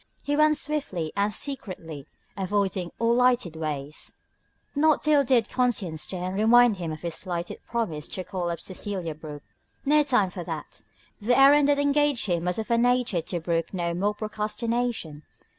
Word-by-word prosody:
He 290 Hz, -, 0 dB
went 305 Hz, 0 st, +4 dB
swiftly 230 Hz, -, -3 dB
and 200 Hz, +1 st, +1 dB
secretly, 185 Hz, -, -4 dB, 0.3 s
avoiding 195 Hz, -2 st, -1 dB
all 230 Hz, 0 st, +2 dB
lighted 245 Hz, -8 st, +2 dB
ways. 150 Hz, -2 st, -5 dB, 0.6 s
Not 305 Hz, +1 st, +3 dB
till 300 Hz, -1 st, +4 dB
then -, -, -10 dB, 0.2 s
did -, -, -21 dB
conscience 215 Hz, -11 st, 0 dB
stir 185 Hz, -, -3 dB
and 185 Hz, -, -3 dB
remind 225 Hz, +2 st, +5 dB
him 170 Hz, -3 st, -4 dB
of 155 Hz, -, -7 dB
his 170 Hz, -1 st, -4 dB
slighted 175 Hz, -1 st, -5 dB
promise 170 Hz, -11 st, -2 dB
to 185 Hz, -, -4 dB
call 180 Hz, -1 st, -3 dB
up 170 Hz, -, -3 dB
Cecelia 185 Hz, -3 st, -3 dB
Brooke. 150 Hz, -1 st, -9 dB, 0.4 s
No 300 Hz, +2 st, +5 dB
time 260 Hz, -7 st, +3 dB
now -, -, -16 dB
for 180 Hz, -1 st, -6 dB
that; -, -, -6 dB, 0.4 s
the 240 Hz, +4 st, +2 dB
errand 280 Hz, +1 st, +7 dB
that 290 Hz, 0 st, +3 dB
engaged 285 Hz, -2 st, +2 dB
him 175 Hz, -3 st, -1 dB
was 180 Hz, 0 st, -1 dB
of 220 Hz, +1 st, -4 dB
a 235 Hz, -, +4 dB
nature 245 Hz, -6 st, +2 dB
to 175 Hz, +2 st, -4 dB
brook 165 Hz, +2 st, -2 dB
no 170 Hz, -1 st, -1 dB
more 200 Hz, +4 st, 0 dB
procrastination. 215 Hz, -5 st, -3 dB
205 Hz, 175 wpm, -26 LUFS, 170-245 Hz, 0.6 s, errand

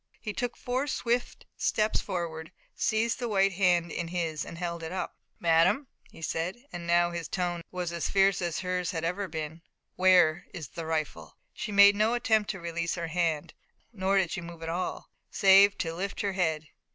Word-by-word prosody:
He 215 Hz, -, -5 dB
took 245 Hz, +1 st, -3 dB
four 255 Hz, +3 st, -2 dB
swift 245 Hz, -2 st, -1 dB
steps 215 Hz, 0 st, +1 dB
forward, 160 Hz, -3 st, -4 dB, 0.2 s
seized 225 Hz, +2 st, 0 dB
the 240 Hz, -2 st, -2 dB
white 195 Hz, -2 st, +3 dB
hand 175 Hz, -3 st, +2 dB
in 170 Hz, -, -3 dB
his 165 Hz, -3 st, -2 dB
and 170 Hz, -, -9 dB
held 170 Hz, -1 st, -4 dB
it 160 Hz, 0 st, -5 dB
up. 185 Hz, -, -4 dB, 0.2 s
"Madame," 165 Hz, -, +3 dB, 0.2 s
he 165 Hz, -, -13 dB
said, 180 Hz, +12 st, -3 dB
and 170 Hz, -1 st, -6 dB
now 175 Hz, 0 st, +3 dB
his 170 Hz, -2 st, -4 dB
tone 175 Hz, -2 st, -2 dB
was 180 Hz, -2 st, -3 dB
as 170 Hz, -1 st, -2 dB
fierce 195 Hz, -1 st, +3 dB
as 170 Hz, -1 st, -2 dB
hers 180 Hz, -1 st, -1 dB
had 165 Hz, -4 st, -3 dB
ever 180 Hz, +4 st, -1 dB
been, 160 Hz, 0 st, -5 dB, 0.4 s
"where 180 Hz, -3 st, +4 dB
is 160 Hz, -6 st, -6 dB
the 165 Hz, -1 st, -6 dB
rifle?" 160 Hz, -2 st, -3 dB, 0.2 s
She 215 Hz, -, -5 dB
made 200 Hz, 0 st, +7 dB
no 215 Hz, +3 st, +2 dB
attempt 220 Hz, -3 st, +2 dB
to 195 Hz, -, -3 dB
release 170 Hz, 0 st, -2 dB
her 170 Hz, -2 st, -4 dB
hand, 165 Hz, -2 st, -1 dB, 0.4 s
nor 195 Hz, -1 st, +1 dB
did 185 Hz, -4 st, +2 dB
she 185 Hz, -, -3 dB
move 170 Hz, -1 st, -9 dB
at 165 Hz, -, -4 dB
all, 175 Hz, +2 st, -4 dB, 0.2 s
save 195 Hz, +1 st, +6 dB
to 165 Hz, -1 st, -2 dB
lift 190 Hz, +4 st, -4 dB
her 200 Hz, -1 st, -1 dB
head. 160 Hz, -5 st, -1 dB
180 Hz, 190 wpm, -29 LUFS, 165-200 Hz, 0.4 s, made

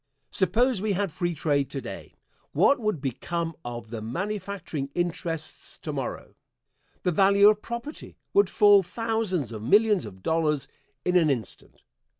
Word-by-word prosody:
Suppose 230 Hz, +3 st, +2 dB
we 210 Hz, -1 st, 0 dB
had 195 Hz, -1 st, -1 dB
free 175 Hz, +1 st, -2 dB
trade 145 Hz, -3 st, 0 dB
to 140 Hz, -, -4 dB
day, -, -, -9 dB, 0.4 s
what 280 Hz, -, +4 dB
would 215 Hz, -, -1 dB
become 165 Hz, +5 st, -3 dB
of 120 Hz, -2 st, -7 dB
the 115 Hz, -2 st, -5 dB
manufacturing 185 Hz, -, -4 dB
interests 170 Hz, -2 st, -3 dB
to -, -, -5 dB
morrow? -, -, -5 dB, 0.7 s
The 180 Hz, -, +2 dB
value 200 Hz, +3 st, +6 dB
of 210 Hz, 0 st, +1 dB
property 235 Hz, +7 st, -7 dB, 0.2 s
would 400 Hz, +1 st, +4 dB
fall 205 Hz, -2 st, +6 dB
thousands 195 Hz, -, -1 dB
of 110 Hz, -2 st, -6 dB
millions 205 Hz, -, +3 dB
of 95 Hz, -2 st, -13 dB
dollars 150 Hz, -4 st, +1 dB, 0.4 s
in 180 Hz, -, +1 dB
an 165 Hz, -3 st, +4 dB
instant. 120 Hz, -, -4 dB
175 Hz, 150 wpm, -26 LUFS, 140-205 Hz, 0.7 s, value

